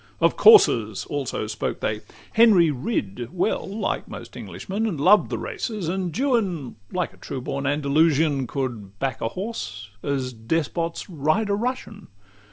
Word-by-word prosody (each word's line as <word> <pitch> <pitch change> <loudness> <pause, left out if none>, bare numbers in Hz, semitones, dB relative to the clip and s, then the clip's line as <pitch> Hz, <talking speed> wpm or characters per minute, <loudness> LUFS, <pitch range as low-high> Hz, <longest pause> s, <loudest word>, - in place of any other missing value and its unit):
Of - - +3
coursers 115 - +6
also 140 -6 -3
spake 105 0 -3
they: 110 0 -2 0.3
Henry 205 -8 +6
rid 120 - -3
Well, 180 +4 -1
like 210 +2 -2
most - - -9
Englishmen, 210 +4 -4
and 170 -9 -3
loved 195 +8 +5
the - - -2
races; 210 -8 -4
And 185 0 -1
Juan, 205 - 0 0.2
like 180 -1 -2
a - - -19
true 135 - -6
born 135 +2 -3
Andalusian, 145 -1 +2
Could 115 -8 -4
back 135 +1 -2
a - - 0
horse, 115 - -6
as 135 -3 -2
despots 160 +7 -2
ride 170 +5 0
a - - +2
Russian. 220 -2 -3
155 Hz, 150 wpm, -24 LUFS, 125-200 Hz, 0.3 s, coursers